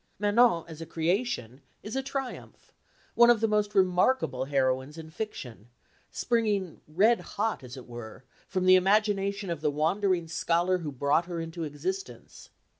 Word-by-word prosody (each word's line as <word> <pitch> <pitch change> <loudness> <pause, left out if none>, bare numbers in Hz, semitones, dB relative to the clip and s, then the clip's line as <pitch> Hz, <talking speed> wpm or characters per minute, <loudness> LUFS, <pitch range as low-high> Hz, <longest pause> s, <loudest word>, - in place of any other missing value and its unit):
Manon, 205 -3 +3
as 160 -1 -10
a 165 - -7
creation, 165 - -2 0.2
is 215 +4 -6
a 270 - 0
triumph, 270 -1 -7 0.4
one 235 0 +6
of 240 -2 +5
the 225 - +2
most 210 -1 0
remarkable 180 - +2
heroines 135 +1 0
in 160 -1 -9
fiction, 130 - -7 0.4
springing 210 -7 -1
red 205 +10 +3 0.2
hot 215 -7 -1
as 125 +1 -9
it 130 - -10
were 120 0 -10 0.2
from 185 -1 -1
the 185 - +7
imagination 200 0 +1
of 165 -3 -4
the 155 - +1
wandering 170 +4 0
scholar 170 +3 +1
who 155 -4 -5
brought 140 +5 +1
her 175 -2 -4
into 165 +1 -5
existence. 150 -3 -6
180 Hz, 155 wpm, -28 LUFS, 150-210 Hz, 0.4 s, the